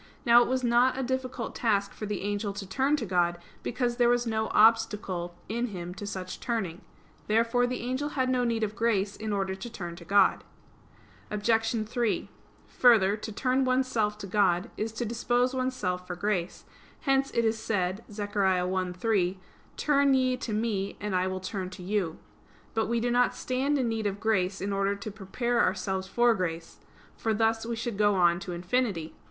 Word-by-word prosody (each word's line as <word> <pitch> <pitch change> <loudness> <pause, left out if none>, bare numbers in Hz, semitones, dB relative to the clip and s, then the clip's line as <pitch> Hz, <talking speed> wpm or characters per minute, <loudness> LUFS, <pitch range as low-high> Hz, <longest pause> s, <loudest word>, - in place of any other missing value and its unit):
Now 240 0 +7
it - - +2
was 260 0 0
not 245 +2 +3
a 265 - -1
difficult 260 -1 -3
task 200 -4 0
for 215 - -6
the 205 -1 -3
angel 205 0 -2
to 200 0 -6
turn 270 +9 +2
to 245 - -3
God; 175 -2 +1 0.2
because 240 -1 -1
there 240 -1 +4
was 245 0 +2
no 220 -1 0
obstacle 210 -6 +2
in 235 +3 -1
him 180 -4 -6
to 200 +2 -7
such 185 -2 -5
turning. 200 -7 -3 0.5
Therefore 230 +3 +2
the 250 0 -3
angel 260 +5 -2
had 260 -3 0
no 255 -1 +1
need 230 -2 0
of 215 0 -2
grace 210 -4 +1
in 215 0 -4
order 195 -1 -1
to 190 +5 -7
turn 175 -6 -6
to 170 - -10
God. 200 +4 +3 0.9
Obj. 225 +1 +1
3: 235 -1 -1 0.4
Further, 215 -5 +5
to 215 +1 -7
turn 255 +5 +1
oneself 255 -5 +1
to 210 - -7
God 190 0 +1
is 220 +1 -2
to 240 +2 -3
dispose 240 +3 +1
oneself 210 -9 -2
for 180 - -4
grace; 185 -2 -2 0.4
hence 270 -1 +2
it 235 - +2
is 220 0 +1
said 200 -2 -1
(Zech. 205 0 -5
1:3): 185 0 +1 0.4
"Turn 280 -2 +3
ye 255 -1 +2
to 245 - -5
Me, 210 -2 -1
and 210 -2 -2
I 185 0 +2
will 185 0 -3
turn 185 0 -4
to 185 0 -10
you." 185 -4 -1 0.6
But 225 -1 0
we 235 +1 +1
do 240 +1 0
not 245 +1 +3
stand 270 +3 0
in 255 -3 0
need 220 -2 -1
of 200 0 -3
grace 195 -3 0
in 200 +1 -2
order 195 0 +1
to 200 +2 -7
prepare 235 +4 -1
ourselves 190 0 0
for 240 +4 +3
grace: 170 -4 -4 0.4
for 220 -1 -1
thus 225 +1 +1
we 235 - -2
should 225 -2 -4
go 205 -1 +4
on 175 -2 +4
to 185 - -6
infinity. 175 -1 -1
215 Hz, 190 wpm, -28 LUFS, 190-240 Hz, 0.9 s, Now